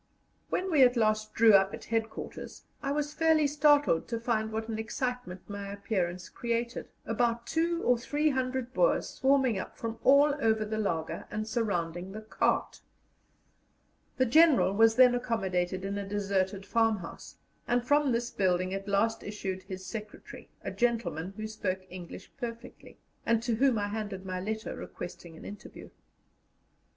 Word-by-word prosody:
When 375 Hz, 0 st, -1 dB
we 300 Hz, -4 st, +4 dB
at 250 Hz, -1 st, +6 dB
last 215 Hz, -1 st, +1 dB
drew 225 Hz, -1 st, +6 dB
up 195 Hz, 0 st, +5 dB
at -, -, -12 dB
headquarters, 225 Hz, -1 st, -4 dB, 0.2 s
I 275 Hz, -, -2 dB
was 295 Hz, 0 st, -1 dB
fairly 320 Hz, -1 st, +3 dB
startled 290 Hz, -, +3 dB
to 230 Hz, -2 st, -3 dB
find 220 Hz, -2 st, -1 dB
what 220 Hz, 0 st, -3 dB
an 220 Hz, -1 st, -3 dB
excitement 245 Hz, -5 st, -4 dB
my 200 Hz, -1 st, -6 dB
appearance 185 Hz, -3 st, -2 dB
created, 235 Hz, 0 st, -3 dB, 0.2 s
about 235 Hz, +1 st, 0 dB
two 335 Hz, +3 st, 0 dB
or 245 Hz, -1 st, +3 dB
three 295 Hz, +5 st, +1 dB
hundred 260 Hz, -1 st, -2 dB
Boers -, -, +2 dB
swarming 265 Hz, -6 st, +2 dB
up -, -, -7 dB
from 230 Hz, 0 st, -5 dB
all 285 Hz, +2 st, +6 dB
over 220 Hz, -2 st, +2 dB
the 215 Hz, +1 st, -3 dB
laager, 165 Hz, -6 st, -2 dB
and 215 Hz, +1 st, -3 dB
surrounding 185 Hz, -6 st, -2 dB
the 215 Hz, -, -6 dB
cart. 215 Hz, -, -1 dB, 1.4 s
The 260 Hz, -, +3 dB
General 290 Hz, -, +5 dB
was 225 Hz, +2 st, +5 dB
then 250 Hz, 0 st, +7 dB
accommodated 190 Hz, -6 st, -1 dB
in 200 Hz, +1 st, -2 dB
a 200 Hz, -1 st, -6 dB
deserted 195 Hz, -1 st, -1 dB
farmhouse, 225 Hz, -6 st, -1 dB, 0.3 s
and 245 Hz, 0 st, +1 dB
from 290 Hz, 0 st, +3 dB
this 235 Hz, 0 st, -1 dB
building 185 Hz, -1 st, +1 dB
at 195 Hz, +1 st, -4 dB
last 225 Hz, +3 st, +1 dB
issued 195 Hz, -2 st, -4 dB
his 185 Hz, 0 st, -8 dB
secretary, 210 Hz, -1 st, -8 dB
a -, -, -3 dB
gentleman 195 Hz, -7 st, -1 dB
who 215 Hz, -, -4 dB
spoke 205 Hz, -4 st, -3 dB
English 180 Hz, -2 st, -9 dB
perfectly, 235 Hz, -2 st, -8 dB, 0.3 s
and 230 Hz, 0 st, +1 dB
to 240 Hz, -1 st, 0 dB
whom 260 Hz, -1 st, +3 dB
I 205 Hz, -1 st, -1 dB
handed 205 Hz, -3 st, -5 dB
my 185 Hz, -1 st, -3 dB
letter 215 Hz, +3 st, -4 dB
requesting 170 Hz, -2 st, -8 dB
an -, -, -12 dB
interview. 205 Hz, -, -10 dB
220 Hz, 160 wpm, -30 LUFS, 195-245 Hz, 1.4 s, then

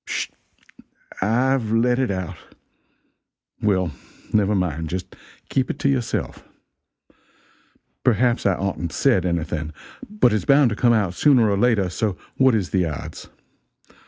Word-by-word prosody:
"Sh! -, -, -2 dB, 0.9 s
I've 120 Hz, +2 st, +1 dB
let 120 Hz, +2 st, +2 dB
it 130 Hz, -, +1 dB
out! 95 Hz, -3 st, -3 dB, 1.3 s
Well, 95 Hz, -5 st, +1 dB, 0.4 s
never 105 Hz, -1 st, +3 dB
mind 80 Hz, -4 st, -2 dB
just 90 Hz, +2 st, -5 dB, 0.3 s
keep 130 Hz, -1 st, 0 dB
it -, -, -3 dB
to 140 Hz, -, 0 dB
yourself. 125 Hz, -4 st, -2 dB, 1.6 s
Perhaps 120 Hz, -1 st, +2 dB
I 95 Hz, -, +2 dB
oughtn't 90 Hz, -4 st, -3 dB
said 105 Hz, -10 st, +2 dB
anything, 80 Hz, -2 st, -2 dB, 0.4 s
but 210 Hz, -, +2 dB
its 105 Hz, -4 st, 0 dB
bound 140 Hz, -3 st, +5 dB
to -, -, -2 dB
come 120 Hz, +2 st, +3 dB
out 100 Hz, -6 st, +1 dB
sooner 125 Hz, 0 st, +4 dB
or -, -, +2 dB
later, 105 Hz, -2 st, +2 dB
so 95 Hz, +2 st, -2 dB, 0.2 s
what 130 Hz, -3 st, +4 dB
is 95 Hz, -5 st, -2 dB
the 95 Hz, -2 st, +2 dB
odds? 75 Hz, -3 st, -7 dB
105 Hz, 135 wpm, -22 LUFS, 95-125 Hz, 1.6 s, bound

